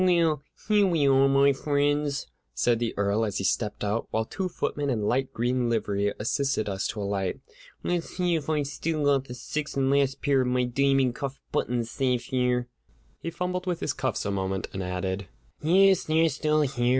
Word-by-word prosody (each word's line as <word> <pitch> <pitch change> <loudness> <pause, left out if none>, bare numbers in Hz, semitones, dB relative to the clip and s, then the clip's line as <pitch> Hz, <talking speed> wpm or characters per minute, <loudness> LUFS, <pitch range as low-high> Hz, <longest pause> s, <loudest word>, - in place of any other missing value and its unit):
"Well, 170 -5 +3 0.3
here 210 -2 +4
we 160 -6 +2
are, 135 0 +5
my 140 +1 +4
friends," 145 0 0 0.3
said 120 - +2
the 120 -1 -2
Earl, 100 +2 +1
as 105 -3 -1
he - - -2
stepped 105 +2 -1
out; 105 +2 -1
while 110 0 0
two 185 - -3
footmen 145 -4 -2
in 115 -5 0
light 130 +5 0
green 120 +1 0
livery 100 -3 0
assisted 135 +1 0
us 95 -1 -1
to 105 - -4
alight. 100 -2 -2 0.4
"Let's 175 -1 -2
see 180 -2 +1
if 155 -3 -2
I've 150 -2 +1
still 155 +2 -2
got 140 -2 +3
the 125 - -8
sixth 150 +4 -4
and 135 0 +2
last 140 -1 +1
pair 140 -2 +3
of 125 - 0
my 125 0 +1
diamond 135 0 +2
cuff 135 0 -5
buttons 120 -1 -1
safe 125 -3 0
here." 125 -1 +1 0.5
He 165 - -3
fumbled 180 +2 -3
with 175 -2 -1
his 140 - -1
cuffs 130 -7 -2
a 100 - 0
moment, 95 0 -2
and 95 - -3
added: 95 +1 -3 0.3
"Yes, 190 +4 +4
they're 160 +1 +3
still 150 +1 +1
here. 125 -4 0
135 Hz, 195 wpm, -27 LUFS, 115-150 Hz, 0.5 s, are